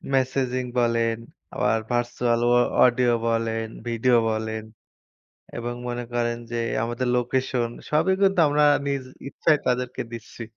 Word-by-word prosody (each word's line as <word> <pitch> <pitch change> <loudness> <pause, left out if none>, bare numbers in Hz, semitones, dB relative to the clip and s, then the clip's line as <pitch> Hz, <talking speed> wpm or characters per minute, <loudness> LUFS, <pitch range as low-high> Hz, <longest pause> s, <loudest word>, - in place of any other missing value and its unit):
Messaging 130 -1 0 0.2
বলেন, 115 -1 +1 0.4
আবার 115 - +1
virtual 120 0 0
অ - - +3 0.3
audio 120 -1 +3
বলেন, 115 -1 0 0.2
ভিডিও 120 +1 +3
বলেন 110 0 -3 0.9
এবং 120 0 -3 0.2
মনে 120 0 -3
করেন 120 0 0
যে - - -3 0.3
আমাদের 120 +2 -2
লোকেশন 125 -1 0 0.2
সবই 175 +5 +3
কিন্তু 195 -2 +3
আমরা 150 +1 +2 0.2
নিজ 140 -2 -1 0.3
ইচ্ছায় 155 0 +2
তাদেরকে 125 0 -1
দিচ্ছি। 115 +1 -8
120 Hz, 125 wpm, -24 LUFS, 115-130 Hz, 0.9 s, অ